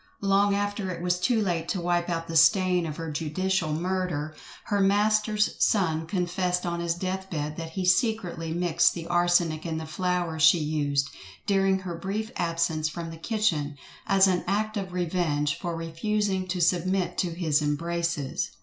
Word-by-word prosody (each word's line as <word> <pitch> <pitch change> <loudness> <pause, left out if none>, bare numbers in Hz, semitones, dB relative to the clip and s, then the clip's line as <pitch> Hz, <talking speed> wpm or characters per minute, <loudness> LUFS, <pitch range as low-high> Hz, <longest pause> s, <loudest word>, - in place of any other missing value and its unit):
Long 200 +1 +3
after 205 -1 -2
it 175 -2 -4
was 180 0 +1
too 230 +4 +2
late 170 -3 -2
to 190 - -1
wipe 175 0 0
out 165 -1 -2
the 165 - -5
stain 180 +1 +4
of 150 - -6
her 165 -1 -4
judicial 165 +3 -1
murder, 170 -2 -2 0.3
her 205 -2 -1
master's 210 +2 +2
son 160 -6 +1
confessed 180 0 -1
on 170 0 -2
his 170 0 -1
death 190 +2 -4
bed 150 -3 -3
that 165 -1 -6
he 185 +1 -2
secretly 185 -5 +1
mixed 170 0 +2
the 170 -1 -6
arsenic 175 -2 +2
in 165 -2 -3
the 160 - -5
flour 175 -1 -2
she 150 +4 +7
used, 145 -3 0 0.4
during 195 -1 +2
her 185 -2 -6
brief 205 +6 -4
absence 165 -2 0
from 165 +1 -6
the 165 - -9
kitchen, 165 -7 -1 0.3
as 195 -2 +5
an 180 -2 +1
act 215 +3 0
of 195 -3 -3
revenge 165 -5 0
for 175 -2 -3
refusing 190 +4 -1
to 180 0 -2
submit 180 +2 +1
to 175 -3 -1
his 160 -4 +1
embraces. 165 0 -1
175 Hz, 170 wpm, -26 LUFS, 165-190 Hz, 0.4 s, she